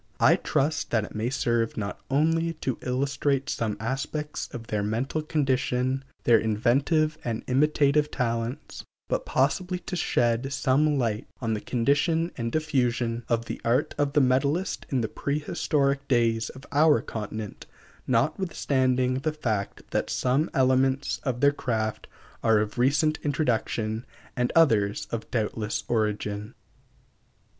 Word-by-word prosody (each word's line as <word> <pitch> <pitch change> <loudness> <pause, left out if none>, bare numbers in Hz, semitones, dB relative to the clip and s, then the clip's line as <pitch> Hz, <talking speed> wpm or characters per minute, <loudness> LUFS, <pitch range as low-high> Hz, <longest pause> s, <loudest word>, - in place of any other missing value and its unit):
I - - +6
trust 145 +2 0
that 110 -3 +1
it - - -8
may 110 +3 -1
serve 120 -3 0
not 100 -2 -4
only 165 +4 +2
to 135 -6 -3
illustrate 140 +2 0
some 110 -2 -2
aspects 135 +5 -3
of 115 -1 -7
their 105 -2 -1
mental 115 +9 -1
condition, 135 -3 0 0.2
their 115 -2 +5
inventive 140 +9 +1
and 115 -2 -3
imitative 150 +2 +3
talents, 120 +2 -3 0.2
but - - -2
possibly 185 -1 +1
to 180 - -6
shed 120 -5 +1
some 140 +3 +2
light 115 -3 -1
on 115 -3 -1
the 105 - -2
condition 155 +7 +1
and 115 -2 -3
diffusion 125 -6 0
of 115 -1 +1
the - - -6
art 125 +5 +1
of 145 -1 +1
the 150 - +5
metalist 140 +8 +1
in 130 -3 +1
the 110 - 0
prehistoric 140 0 -1
days 115 -3 +2
of 130 +2 -11
our 150 +1 +5
continent, 110 -1 -6 0.4
notwithstanding 130 - +1
the 155 +3 -1
fact 110 -10 -3
that - - 0
some 135 +6 +1
elements 130 +1 +2
of 125 -2 -2
their 145 0 +5
craft 110 -5 -2 0.3
are 110 -1 +4
of 105 +3 -1
recent 150 +5 +2
introduction 115 -5 -1 0.3
and 125 -1 0
others 110 -11 +3
of 115 -1 -4
doubtful 110 -2 -2 0.2
origin. 105 -1 -1
130 Hz, 135 wpm, -26 LUFS, 115-145 Hz, 0.4 s, I